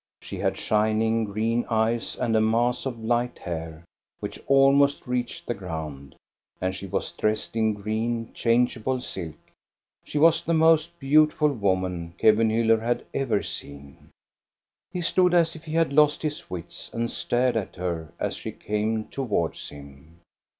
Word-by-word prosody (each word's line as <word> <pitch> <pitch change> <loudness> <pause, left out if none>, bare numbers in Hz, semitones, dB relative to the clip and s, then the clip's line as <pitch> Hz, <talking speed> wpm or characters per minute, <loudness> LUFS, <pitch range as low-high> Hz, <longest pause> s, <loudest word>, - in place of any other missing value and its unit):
She - - -8
had - - 0
shining, 110 +1 +1
green 110 +3 0
eyes, 115 +1 0
and 115 -2 0
a 110 - +4
mass 120 +4 +1
of 125 -3 -4
light 120 +2 0
hair, 80 -1 -6 0.4
which - - -6
almost 140 +1 +4
reached 125 -1 -3
the 120 - -1
ground, 80 - -7 0.4
and 95 0 -1
she 100 - -7
was 95 +1 -2
dressed 110 +1 -1
in 110 -1 +2
green, 110 +3 -2
changeable 120 +1 +1
silk. 90 -10 -6 0.7
She - - -5
was 165 +2 +5
the 165 - +1
most 160 +1 +3
beautiful 150 +2 +4
woman 95 -6 -1
Kevenhiiller 110 +1 +4
had 120 +2 -1
ever 125 -7 0
seen. 70 -1 -9 0.8
He 180 0 -4
stood 180 +1 +3
as 170 -1 +3
if 160 +1 -12
he 155 - -6
had 165 -3 +2
lost 150 +1 +4
his 150 -1 -4
wits, 90 -2 -7
and 115 0 -2
stared 125 0 0
at 110 -4 -3
her 85 -4 -4
as - - -2
she - - -6
came 110 +1 -2
towards 105 -11 -2
him. 70 +3 -14
115 Hz, 150 wpm, -25 LUFS, 95-135 Hz, 0.8 s, was